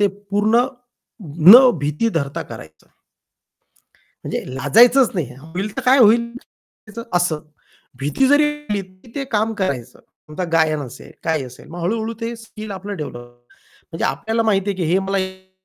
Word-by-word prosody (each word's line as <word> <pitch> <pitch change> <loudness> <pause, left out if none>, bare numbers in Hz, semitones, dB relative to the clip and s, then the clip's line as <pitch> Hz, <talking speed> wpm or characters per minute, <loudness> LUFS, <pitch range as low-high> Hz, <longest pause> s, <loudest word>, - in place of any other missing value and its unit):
ते 205 - +5
पूर्ण 205 +4 +1 0.9
न 255 +4 +10
भीती 150 +10 -1
धरता 140 -3 -2
करायचं 80 0 -12
आहे. - - -36 1.3
म्हणजे - - -3
लाजायचंच 235 - +5
नाही, 145 -9 -3
होईल 180 +7 -6
तर - - -1
काय 260 +2 +5
होईल? 235 0 +5 0.8
असं. 175 -3 +1 0.6
भीती 145 - +1
जरी 290 +2 +5 0.3
आली 205 -1 0
तरी 185 +4 -19
ते 280 - -3
काम 220 +1 +1
करायचं, 135 - -3 0.3
आता 180 +4 -3
गायन 155 -2 +2
असेल, 125 - -11
काय 160 -3 0
असेल, 125 0 -13
मग 175 +1 -7
हळू-हळू 220 +5 -1
ते 230 +1 -3
स्किल 215 -1 -10
आपलं 200 +1 -6
डेव्हलप 150 -6 -6
होतं. 120 0 -15 0.5
म्हणजे 165 - -3
आपल्याला 225 +1 -1
माहिती 205 -2 +1
आहे 195 - -4
की 180 - -2
हे 185 - +4
मला 195 +1 -2
हे 190 0 -6
195 Hz, 160 wpm, -20 LUFS, 155-225 Hz, 1.3 s, न